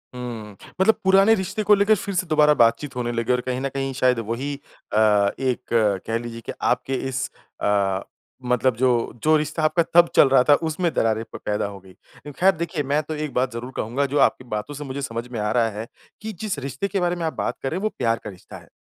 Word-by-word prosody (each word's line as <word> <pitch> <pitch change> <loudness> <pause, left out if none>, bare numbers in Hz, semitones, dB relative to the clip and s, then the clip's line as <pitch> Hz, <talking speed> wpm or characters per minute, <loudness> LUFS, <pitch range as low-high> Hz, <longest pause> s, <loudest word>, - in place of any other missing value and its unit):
हुँ। 115 -4 -7 0.3
मतलब 220 +3 +5
पुराने 195 +3 +5
रिश्ते 190 +2 -3
को 210 - +6
लेके 205 +2 +4
फिर 200 -1 -5
से 185 0 0
दोबारा 150 -1 +4
बातचीत 125 +4 +2
होने 120 -1 -2
लगी, 115 0 -1
और 125 - 0
कहीं 125 0 -3
ना 135 - -1
कहीं 135 0 -3
शायद 125 -1 +2
वही 115 +6 -3 0.4
अ, - - +2 0.4
एक 130 -2 0 0.5
कह 115 - 0
लीजिए 115 0 -7
कि - - -4
आपके 135 - 0 0.2
इस 130 0 -2 0.3
अ, 100 -2 +1 0.4
मतलब 125 0 +1
जो, 120 -1 +1
जो 155 0 +5
रिश्ता 155 +1 -2
आपका 155 +2 +3
तब 170 0 +7
चल - - +7
रहा 130 -1 +5
था, 145 - +5
उसमें 160 +3 0
दरारें 110 0 +1
प - - -5
पैदा 105 -1 0
हो 100 -1 -7
गई। 95 -1 -17 0.5
ख़ैर 190 +2 +6
देखिए, 165 -1 -3
मैं 145 +2 +1
तो 155 +1 -5
एक 150 -1 -4
बात 125 +1 0
ज़रूर 120 +2 -6
कहूँगा, 125 +6 -1
जो 140 +1 -2
आपकी - - +3
बातों 105 +7 -4
से 145 +1 -6
मुझे 140 0 -5
समझ 115 -3 -4
में 115 - -4
आ 105 0 -1
रहा 115 -1 +2
है, 110 +1 -6 0.4
कि 220 +1 -5
जिस 210 -7 -2
रिश्ते 135 +6 -3
के 195 0 -2
बारे 175 -1 0
में 170 -1 -3
आप 160 - -2
बात - - -2
कर 135 - 0
रहे 170 - -2
हैं - - -4
वो 215 - +1
प्यार 115 -2 +1
का - - -6
रिश्ता 95 -3 -12
है। - - -16
135 Hz, 240 wpm, -23 LUFS, 115-160 Hz, 0.5 s, तब